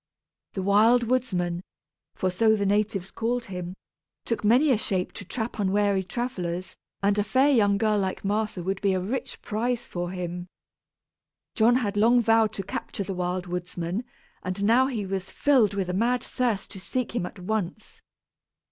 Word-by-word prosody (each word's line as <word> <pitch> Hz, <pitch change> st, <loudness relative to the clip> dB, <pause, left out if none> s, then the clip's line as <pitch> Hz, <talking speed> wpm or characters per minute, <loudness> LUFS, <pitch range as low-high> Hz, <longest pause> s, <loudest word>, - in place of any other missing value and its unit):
The 190 Hz, -, -3 dB
Wild 220 Hz, +5 st, +5 dB
Woodsman, 190 Hz, -9 st, 0 dB, 0.5 s
for 185 Hz, -, 0 dB
so 220 Hz, +4 st, +4 dB
the 200 Hz, -1 st, -1 dB
natives 200 Hz, -2 st, 0 dB
called 235 Hz, +1 st, -1 dB
him, 180 Hz, -2 st, -6 dB, 0.5 s
took 230 Hz, -, -2 dB
many 250 Hz, +8 st, +5 dB
a 245 Hz, -, +4 dB
shape 185 Hz, -4 st, -1 dB
to -, -, -8 dB
trap 220 Hz, +3 st, -4 dB
unwary 200 Hz, 0 st, +2 dB
travellers, 185 Hz, -5 st, -4 dB, 0.3 s
and 200 Hz, +1 st, +3 dB
a -, -, +3 dB
fair 265 Hz, +7 st, +3 dB
young 205 Hz, -6 st, +4 dB
girl 215 Hz, 0 st, +2 dB
like 190 Hz, 0 st, -2 dB
Martha 210 Hz, -2 st, -1 dB
would 190 Hz, +2 st, -2 dB
be 200 Hz, -2 st, +2 dB
a -, -, +1 dB
rich 220 Hz, +9 st, -4 dB
prize 240 Hz, +2 st, -1 dB
for 175 Hz, 0 st, -4 dB
him. 180 Hz, -1 st, -5 dB, 1.1 s
John 235 Hz, +1 st, +4 dB
had 210 Hz, -5 st, 0 dB
long 235 Hz, +4 st, +5 dB
vowed 225 Hz, -1 st, +4 dB
to 195 Hz, -, -4 dB
capture 200 Hz, +1 st, -4 dB
the 195 Hz, -, -4 dB
Wild 180 Hz, 0 st, -2 dB
Woodsman; 180 Hz, +3 st, -3 dB, 0.4 s
and 185 Hz, +2 st, -3 dB
now 240 Hz, +5 st, +5 dB
he 225 Hz, -7 st, -3 dB
was 190 Hz, 0 st, -3 dB
filled 250 Hz, -9 st, +3 dB
with 195 Hz, -2 st, -1 dB
a 180 Hz, -, -2 dB
mad 240 Hz, +5 st, +1 dB
thirst 235 Hz, -6 st, -1 dB
to 195 Hz, -, -8 dB
seek 235 Hz, +7 st, -3 dB
him 180 Hz, -7 st, 0 dB
at -, -, -12 dB
once. 205 Hz, +1 st, -4 dB
205 Hz, 175 wpm, -26 LUFS, 185-230 Hz, 1.1 s, Wild